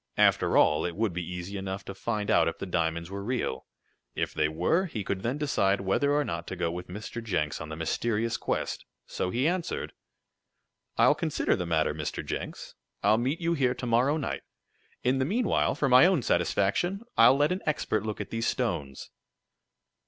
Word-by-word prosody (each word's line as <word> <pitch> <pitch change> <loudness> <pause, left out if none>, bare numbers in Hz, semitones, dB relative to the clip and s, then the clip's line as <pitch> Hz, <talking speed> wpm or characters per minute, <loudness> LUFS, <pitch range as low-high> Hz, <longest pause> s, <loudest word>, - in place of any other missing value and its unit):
After - - +4
all 75 +1 +4
it 85 -1 -3
would 110 -2 0
be 90 - -2
easy 90 +3 -5
enough 95 0 -5
to 100 - -6
find 105 +2 -2
out 85 -6 +4
if 80 - -2
the - - -5
diamonds 85 -1 -1
were 100 0 -5
real. 120 - -2 0.5
If - - -2
they 75 0 +2
were, 90 - +1
he 110 - -4
could 95 0 -3
then 125 +6 -1
decide 100 -10 +1
whether 100 +9 +1
or 145 0 +2
not 85 0 -4
to - - -4
go 85 -2 -1
with 90 +1 -6
Mr. 105 +5 -6
Jenks 80 -10 -1
on 80 - -6
the 80 - -5
mysterious 110 +8 -1
quest. - - -2 0.2
So 90 - -3
he 125 +9 +1
answered: 175 0 -2 1.0
"I'll - - +6
consider - - 0
the 90 - -3
matter, 80 -2 +1
Mr. 75 -1 -4
Jenks. - - -5 0.3
I'll 105 +2 +4
meet 135 +8 -1
you 170 0 +1
here 130 -5 +1
to 125 - -5
morrow 125 +6 +3
night. 145 - -3 0.6
In 130 +2 +2
the - - +2
meanwhile, 220 - +1
for 145 - +1
my 130 +6 +7
own 180 -9 +2
satisfaction, 105 - +1
I'll 115 +4 +7
let 145 +3 +3
an 185 - -1
expert 110 -8 0
look 110 -1 -4
at - - -6
these 115 0 -1
stones." 70 -2 -2
105 Hz, 195 wpm, -28 LUFS, 90-135 Hz, 1.0 s, my